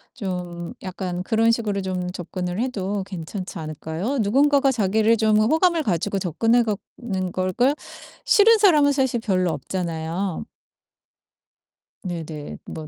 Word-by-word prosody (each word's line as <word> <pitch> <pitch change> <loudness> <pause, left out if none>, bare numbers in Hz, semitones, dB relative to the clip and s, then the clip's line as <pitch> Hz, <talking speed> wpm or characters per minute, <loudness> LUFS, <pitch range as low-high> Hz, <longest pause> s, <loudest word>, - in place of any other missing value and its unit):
좀 180 -5 -5
약간 185 -1 -4
그런 225 +2 +3
식으로 210 -4 -1
좀 185 -1 -3
접근을 180 +1 -4
해도 205 -5 -2
괜찮지 185 0 -6
않을까요? 160 - -4
누군가가 275 +5 +3
자기를 220 0 +2
좀 215 -1 +3
호감을 320 - +3
가지고 195 - -1
접근해 225 +7 +2
가는 200 -3 -4
걸 185 0 -1
걸 260 +7 +3 0.5
싫은 445 +2 +6
사람은 300 -8 +5
사실 265 -4 +1
별로 185 -5 +1
없잖아요. 165 +3 -3 1.6
네네. 160 -5 -6
뭐 155 -1 -7
195 Hz, 270 characters per minute, -23 LUFS, 180-235 Hz, 1.6 s, 싫은